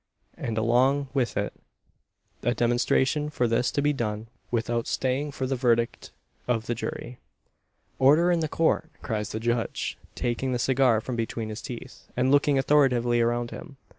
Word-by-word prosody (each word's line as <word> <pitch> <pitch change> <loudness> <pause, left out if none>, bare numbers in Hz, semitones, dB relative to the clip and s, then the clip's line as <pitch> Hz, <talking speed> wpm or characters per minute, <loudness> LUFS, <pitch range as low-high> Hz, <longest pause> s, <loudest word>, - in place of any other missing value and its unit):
and, 115 -1 -4
along 130 +5 +2
with 130 -4 0
it, - - -1 0.9
a 120 +2 0
demonstration 130 +5 +1
for 125 -5 0
this 115 +2 +1
to 145 - -1
be 150 0 +3
done 110 -4 -3 0.2
without 115 0 -1
staying 135 +3 -1
for 130 -1 -3
the 135 +1 -1
verdict 120 -2 0 0.4
of 115 -2 0
the 120 - -1
jury, 120 +1 -6 0.8
"Order 150 +7 +5
in 175 - +2
the 160 - 0
Court!" 160 0 +1
cries 105 -3 -2
the 110 - -3
judge, 120 0 -2 0.2
taking 125 +2 -1
the - - +1
cigar 125 -2 +3
from 125 +2 -4
between 115 -1 -3
his 110 +1 -6
teeth, 125 +2 -9
and 130 +1 +2
looking 145 0 +4
authoritatively 125 -4 +3
around 120 0 0
him. 155 -5 -9
125 Hz, 165 wpm, -26 LUFS, 115-135 Hz, 0.9 s, Order